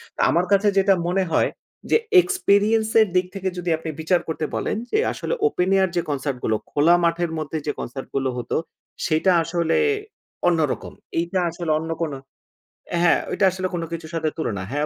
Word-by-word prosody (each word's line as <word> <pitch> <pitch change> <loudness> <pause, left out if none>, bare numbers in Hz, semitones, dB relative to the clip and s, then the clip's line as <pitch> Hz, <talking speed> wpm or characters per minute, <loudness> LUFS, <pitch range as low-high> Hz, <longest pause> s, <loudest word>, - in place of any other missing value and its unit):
তো - - -16
আমার 170 +2 +2
কাছে 200 +1 +4
যেটা 195 0 +5
মনে 190 +2 +1
হয় - - +3 0.4
যে, - - +7 0.2
এক্সপেরিয়েন্স 220 - +2
এর 215 - +4
দিক 180 0 +3
থেকে 190 -1 -2
যদি 180 0 -3
আপনি 160 0 -6
বিচার 175 +3 +2
করতে 160 -1 -2
বলেন - - -1
যে - - +2 0.2
আসলে - - -3
ওপেন 185 - 0
এয়ার 190 -1 +3
যে - - +3
কনসার্ট 140 -2 -2
গুলো, 110 - +1 0.2
খোলা 155 +4 +5
মাঠের 170 0 +1
মধ্যে 155 0 -3
যে 145 - +2
কনসার্ট 130 +2 -6
গুলো 135 -1 +1
হতো, 120 -1 -3 0.5
সেইটা 165 +2 +2
আসলে 165 0 0 0.7
অন্যরকম। 160 -5 0 0.3
এইটা 175 +3 -1
আসলে 170 -1 -3
অন্য 160 +1 -5
কোনো 150 -4 -3 0.8
হ্যাঁ, 175 - +4
ওইটা 195 - +2
আসলে 185 0 -2
কোনো 165 -1 -2
কিছুর 165 -1 -6
সাথে 160 -1 0
তুলনা 105 - -2
হ্যাঁ, 145 +2 0
170 Hz, 180 wpm, -23 LUFS, 155-190 Hz, 0.8 s, যে